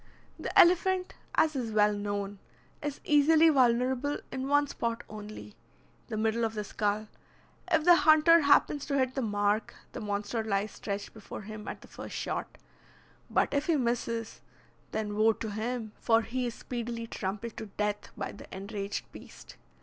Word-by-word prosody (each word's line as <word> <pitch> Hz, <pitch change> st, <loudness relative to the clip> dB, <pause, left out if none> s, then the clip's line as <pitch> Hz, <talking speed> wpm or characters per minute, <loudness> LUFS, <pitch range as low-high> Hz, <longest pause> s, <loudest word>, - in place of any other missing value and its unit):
The -, -, -3 dB
elephant, 365 Hz, +1 st, +4 dB, 0.2 s
as 315 Hz, -2 st, +3 dB
is 240 Hz, -4 st, -2 dB
well 210 Hz, -1 st, +4 dB
known, 205 Hz, -1 st, -3 dB, 0.4 s
is 295 Hz, -2 st, -4 dB
easily 310 Hz, +2 st, +5 dB
vulnerable 260 Hz, +1 st, +2 dB
in 260 Hz, 0 st, -3 dB
one 290 Hz, +1 st, +4 dB
spot 235 Hz, -4 st, -3 dB
only, 210 Hz, 0 st, -9 dB, 0.5 s
the 220 Hz, -, -4 dB
middle 220 Hz, +2 st, +1 dB
of 225 Hz, 0 st, -1 dB
the 210 Hz, -, -2 dB
skull. 210 Hz, +1 st, -1 dB, 0.6 s
If 320 Hz, -2 st, +4 dB
the 350 Hz, +1 st, +7 dB
hunter 315 Hz, +2 st, +6 dB
happens 285 Hz, 0 st, +3 dB
to 280 Hz, -, 0 dB
hit 260 Hz, -1 st, +1 dB
the 270 Hz, -, -1 dB
mark, 205 Hz, -1 st, 0 dB, 0.2 s
the -, -, -6 dB
monster 205 Hz, +2 st, -2 dB
lies 210 Hz, -1 st, -1 dB
stretched 200 Hz, -1 st, -5 dB
before 220 Hz, -1 st, -9 dB
him 215 Hz, +1 st, -8 dB
at -, -, -6 dB
the -, -, -14 dB
first -, -, -8 dB
shot; -, -, -4 dB, 0.7 s
but -, -, +1 dB
if 285 Hz, +1 st, 0 dB
he 335 Hz, -, +3 dB
misses, 235 Hz, -3 st, -2 dB, 0.5 s
then 210 Hz, -1 st, -2 dB
woe 220 Hz, +1 st, +4 dB
to 220 Hz, 0 st, -5 dB
him, 220 Hz, +1 st, -3 dB
for 225 Hz, -1 st, +3 dB
he 250 Hz, +1 st, -2 dB
is 235 Hz, -, -5 dB
speedily 235 Hz, -1 st, -5 dB
trampled 210 Hz, +1 st, -4 dB
to 220 Hz, -, -6 dB
death 210 Hz, +1 st, -3 dB
by -, -, -3 dB
the -, -, -13 dB
enraged 200 Hz, +1 st, -5 dB
beast. -, -, -12 dB
230 Hz, 165 wpm, -30 LUFS, 210-275 Hz, 0.7 s, the